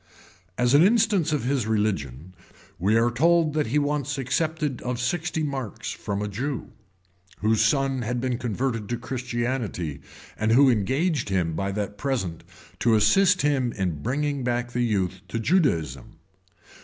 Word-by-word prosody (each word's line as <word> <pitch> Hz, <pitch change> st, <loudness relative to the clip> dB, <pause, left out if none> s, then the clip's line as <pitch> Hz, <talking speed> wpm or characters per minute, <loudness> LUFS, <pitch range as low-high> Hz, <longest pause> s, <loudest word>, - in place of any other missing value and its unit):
As 125 Hz, +1 st, +2 dB
an 145 Hz, -, +7 dB
instance 205 Hz, -4 st, +3 dB
of 150 Hz, -5 st, 0 dB
his 130 Hz, -3 st, 0 dB
religion, 95 Hz, -, -2 dB, 0.5 s
we 100 Hz, +5 st, +3 dB
are 120 Hz, +1 st, +3 dB
told 160 Hz, +4 st, +3 dB
that 150 Hz, -4 st, 0 dB
he 130 Hz, +7 st, 0 dB
once 145 Hz, -1 st, -1 dB
accepted 150 Hz, +1 st, -1 dB
of 125 Hz, -1 st, -3 dB
sixty 160 Hz, +5 st, -1 dB
marks 135 Hz, -7 st, -4 dB
from 100 Hz, -1 st, -4 dB
a -, -, -2 dB
Jew, 125 Hz, +6 st, -4 dB, 0.7 s
whose 110 Hz, 0 st, +2 dB
son 135 Hz, +3 st, +1 dB
had 120 Hz, +1 st, -2 dB
been 125 Hz, -1 st, -2 dB
converted 115 Hz, -2 st, -2 dB
to 120 Hz, -, -1 dB
Christianity, 120 Hz, -, -3 dB, 0.3 s
and 110 Hz, +1 st, +1 dB
who 135 Hz, +2 st, +6 dB
engaged 130 Hz, -, 0 dB
him 90 Hz, -4 st, 0 dB
by 100 Hz, +4 st, -2 dB
that 100 Hz, 0 st, -4 dB
present 115 Hz, -, -2 dB, 0.4 s
to 115 Hz, -2 st, +3 dB
assist 180 Hz, -, +4 dB
him 135 Hz, -4 st, +1 dB
in 90 Hz, -7 st, -2 dB
bringing 140 Hz, -, -1 dB
back 120 Hz, 0 st, -1 dB
the 125 Hz, -, -1 dB
youth 95 Hz, -5 st, -1 dB
to 115 Hz, -, -4 dB
Judaism. 85 Hz, -, 0 dB
120 Hz, 155 wpm, -25 LUFS, 105-145 Hz, 0.7 s, an